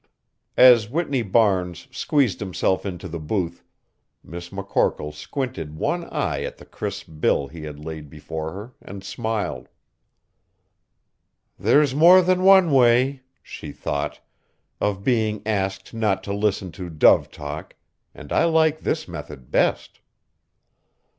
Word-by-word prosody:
As 120 -4 +7
Whitney 140 -2 -1
Barnes 95 -5 +1
squeezed 135 - +1
himself 95 0 -1
into 95 0 -6
the 85 -1 -6
booth, 85 +2 -3 0.6
Miss 85 +1 -9
McCorkle 100 -6 -1
squinted 80 - -5
one - - -1
eye - - -2
at - - -5
the - - -14
crisp 100 -1 -6
bill 70 - +2
he 80 0 -9
had 75 -1 -8
laid 80 -2 -7
before 80 +1 -6
her 105 +8 -9
and 95 0 -10
smiled. 110 - -3 1.9
"There's 145 -3 +3
more 175 +6 +7
than 185 +1 +2
one 190 -3 +6
way," 130 +1 +4 0.2
she - - -9
thought, 70 0 -4 0.6
"of 100 -1 -1
being 110 -3 0
asked 95 -2 -2
not 110 -4 0
to 100 - -4
listen 100 -3 -1
to 90 +2 -8
dove 80 -2 +4
talk, 75 +2 -8 0.4
and - - -8
I - - +3
like 160 -2 +3
this 155 0 -2
method 75 -6 -9
best." - - 0
100 Hz, 130 wpm, -23 LUFS, 85-125 Hz, 1.9 s, As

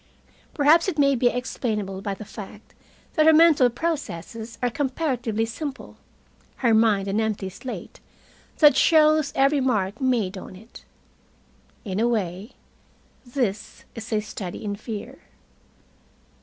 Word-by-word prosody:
Perhaps 310 +4 +4
it 360 -5 -2
may 280 -1 +4
be 250 -1 +2
explainable 215 -6 -3
by 200 -1 -3
the 215 - -10
fact 210 0 -11 0.4
that 310 -1 +3
her 320 - +8
mental 310 -5 +6
processes 230 - -5
are 245 - +1
comparatively 250 -5 -1
simple, 275 +4 -7 0.7
her 230 - +5
mind 215 -3 +3
an 200 +2 0
empty 215 -3 -2
slate 250 +7 -8 0.6
that 295 -4 +6
shows 310 -1 +4
every 275 +1 +3
mark 215 -3 -1
made 225 -7 0
on 185 - -11
it. 220 +5 -15 1.0
In 195 -1 -3
a 235 - +2
way, 200 -2 -2 0.7
this 225 -5 -3
is 225 0 -8
a 215 -1 +1
study 205 -1 -7
in 205 -1 -2
fear. 215 0 -7
230 Hz, 130 wpm, -24 LUFS, 210-275 Hz, 1.0 s, her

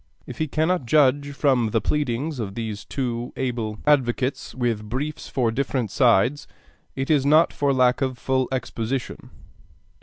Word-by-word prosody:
If - - -9
he 155 - 0
cannot 155 -1 0
judge 145 +1 +3
from 130 -5 +2
the 115 - +1
pleadings 145 +3 -1
of 100 -3 -4
these 110 -3 -5
two 120 -3 -3
able 120 -5 -2
advocates 135 -2 +1
with 115 -4 -2
briefs 145 +6 -4
for 120 -4 0
different 125 -3 -2
sides, 125 +2 +3 0.5
it 135 +3 -2
is 145 -3 +3
not 155 +4 +4
for 140 -1 +1
lack 130 -1 +3
of 130 -2 -1
full 130 0 0
exposition. 130 -1 -4
130 Hz, 150 wpm, -23 LUFS, 120-145 Hz, 0.5 s, not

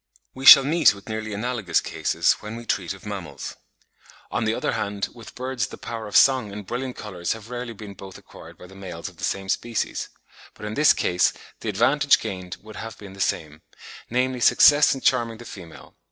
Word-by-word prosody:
We 135 +1 -3
shall 135 - +12
meet 155 -4 +4
with 100 - -15
nearly 110 0 -4
analogous 110 -2 -1
cases - - 0
when 105 +1 -7
we 120 0 -8
treat - - -1
of 95 - -16
mammals. 95 -8 -6 0.8
On 110 - -1
the 110 - +1
other - - -1
hand, 100 -1 -3
with 115 -1 -13
birds 125 -4 -2
the - - -10
power 115 -2 -6
of 105 - +2
song 130 -6 +4
and 105 0 -8
brilliant 125 +4 -4
colours 90 -5 -4
have 115 +1 -11
rarely 120 -1 -5
been 105 -2 -10
both 95 -1 -11
acquired - - -14
by - - -13
the 95 - -15
males 95 -4 -7
of - - -20
the - - -11
same 95 0 -2
species; 115 +4 -2 0.5
but - - -9
in 105 - -4
this 150 +5 +5
case 90 0 +1 0.3
the 110 - -4
advantage 135 +8 +3
gained 90 -1 -6
would 110 -1 -11
have 115 0 -7
been 100 -2 -11
the 100 - -14
same, 75 -4 -2 0.5
namely 125 +1 0
success 145 +4 +6
in 135 - -8
charming 115 -1 +1
the 120 - -12
female. 85 -8 -12
110 Hz, 205 wpm, -24 LUFS, 100-125 Hz, 0.8 s, shall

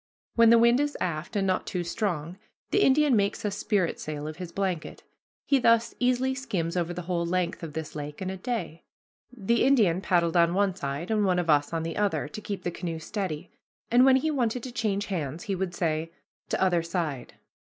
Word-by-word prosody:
When 230 -1 +6
the 235 - +7
wind 235 +2 +5
is 290 0 -1
aft, 170 +4 -3
and 200 -1 +1
not 185 -1 0
too 180 -2 -2
strong, 175 -2 -3 0.3
the 405 - +3
Indian 285 -2 +4
makes 200 0 0
a - - +2
spritsail 170 -7 -2
of 155 - -7
his 180 -2 -7
blanket. 185 -4 -3 0.4
He 275 - +3
thus 230 -1 +3
easily 255 +1 +2
skims 200 -11 -3
over 175 -1 0
the 175 0 -5
whole 175 0 -1
length 175 0 -1
of 160 -3 -7
this 160 0 -6
lake 150 0 -6
in 190 0 -3
a - - -4
day. 180 -6 -4 0.5
The 235 -1 +1
Indian 210 -10 +4
paddled 170 -4 +1
on 170 0 +4
one 200 -1 +2
side, 145 +2 -4
and 215 -1 +2
one 185 -2 +2
of 170 -3 +2
us 145 -1 +2
on 165 -1 -2
the 165 0 -4
other, 195 -9 0
to 180 +8 -8
keep 200 -3 -5
the 175 - -1
canoe 170 -1 -4
steady, 160 -2 -4 0.4
and 245 +2 +6
when 265 0 +6
he 310 +4 +1
wanted 245 -4 -1
to 255 - -6
change 210 -4 -1
hands 160 -5 -4
he 200 - -2
would 185 -2 -3
say, 160 -1 -1 0.4
"T' - - 0
other 180 -3 +2
side." 165 -7 -4
185 Hz, 210 wpm, -27 LUFS, 165-225 Hz, 0.5 s, the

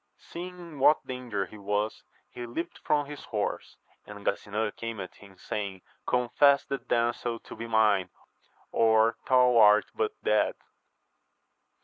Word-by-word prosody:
Seeing 180 +1 -8
in 170 -5 -10
what 150 +3 +4
danger 125 -6 -3
he 105 - -13
was, 105 +2 -2 0.3
he 120 -1 -8
leaped 165 +9 -5
from 145 -1 +1
his 145 0 -9
horse; 105 -2 -3 0.3
and 105 -1 -10
Gasinan 105 +1 -1
came 115 -2 -5
at 95 - -7
him, 100 -2 -17
saying, 95 -1 -5 0.2
Confess 140 +3 +3
the 140 -1 -3
damsel 120 0 -1
to - - -11
be 115 - -6
mine, 105 -5 +3 0.6
or 110 0 +3
thou 125 -2 +5
art 105 -1 +7
but 435 0 -1
dead - - +2
115 Hz, 140 wpm, -28 LUFS, 105-130 Hz, 0.6 s, art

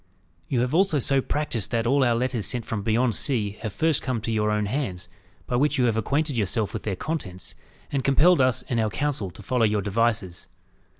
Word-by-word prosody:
You 125 -3 0
have 125 +3 -1
also 180 -2 +3
so 135 0 +2
practised 135 -7 -2
that 115 -1 0
all 135 +3 +3
our 120 -2 +3
letters 120 -2 -1
sent 120 -3 -1
from 110 -3 -3
beyond 115 +3 +1
sea 105 -7 0
have 110 -2 -3
first 160 +5 +1
come 130 -3 -2
to 115 - -3
your 105 -1 +1
own 105 0 0
hands, 100 -7 -3 0.4
by 125 - -1
which 145 +2 +2
you 125 - +3
have 115 -2 +2
acquainted 140 +6 0
yourself 105 -1 0
with - - -4
their 100 -3 -3
contents, 100 - -4 0.4
and 135 -2 -1
compelled 150 +4 +4
us 130 -1 +2
and 120 - -2
our 110 -1 +1
council 135 -5 -2
to 95 +4 -13
follow 125 +3 +1
your 105 -2 +2
devices. 105 -4 -1
120 Hz, 215 wpm, -25 LUFS, 105-135 Hz, 0.4 s, compelled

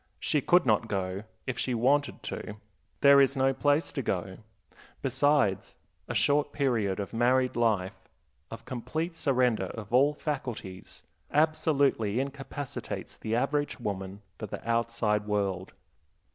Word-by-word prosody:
She 150 - +1
could 175 +1 +4
not 110 -1 +2
go, 95 0 -3 0.2
if 130 - -3
she 125 - 0
wanted 140 +5 +1
to; 105 - -5 0.5
there 140 0 +8
is 135 0 +2
no 135 0 +3
place 145 +4 +1
to 135 - -3
go. 95 -4 -3 0.6
Besides, 135 -6 +1 0.3
a - - -4
short 145 0 +2
period 115 -9 0
of 100 - -5
married 125 +2 +2
life, 110 -6 0 0.4
of 115 - -9
complete 155 +7 -3
surrender 130 -7 +1
of 110 0 -8
all 140 +4 +4
faculties, 125 - -6 0.3
absolutely 145 -8 +2
incapacitates 140 0 -5
the 110 +1 -3
average 145 +4 0
woman 100 -2 -5 0.2
for - - -5
the - - -8
outside 115 -2 0
world. 100 -3 -1
125 Hz, 130 wpm, -29 LUFS, 105-140 Hz, 0.6 s, there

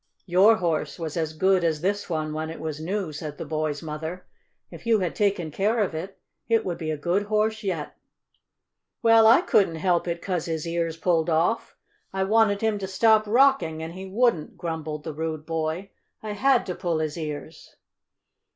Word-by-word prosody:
"Your 190 +5 +5
horse 170 -6 -1
was 160 -3 -5
as 160 -2 -2
good 190 +1 +3
as 160 -3 0
this 200 +3 -1
one 155 -2 -2
when 155 +1 -3
it 165 - -7
was 155 -2 -4
new," 185 -1 -3
said 150 -1 -6
the - - -5
boy's 155 -1 -2
mother. 160 +3 -6 0.5
"If - - -11
you 225 -1 +5
had 180 -3 -1
taken 195 -6 0
care 205 +8 +1
of 205 -6 0
it, 180 +5 -6 0.3
it 230 -1 +3
would 175 -2 -3
be 160 - -3
a 155 - -1
good 180 +7 0
horse 215 0 +1
yet." 180 -8 -3 1.1
"Well, 225 -1 +7
I 230 +9 +7
couldn't 200 - +2
help 175 +1 +1
it 170 0 -2
'cause 180 -2 -2
his 160 -1 -3
ears 165 -1 -2
pulled 165 -1 +1
off! 165 +8 0 0.3
I 190 0 -1
wanted 210 0 +3
him 220 -2 +1
to 190 - -4
stop 215 +2 +3
rocking 235 -10 +3
and 165 +1 -6
he 190 +1 -8
wouldn't!" 220 -6 +1
grumbled 160 -3 -4
the 160 - -5
rude 155 0 -4
boy. 165 +4 -3 0.3
"I 215 - -4
had 255 +4 +2
to 180 - -3
pull 175 -3 -2
his 155 -1 -2
ears!" 155 -3 -7
175 Hz, 190 wpm, -25 LUFS, 160-205 Hz, 1.1 s, Well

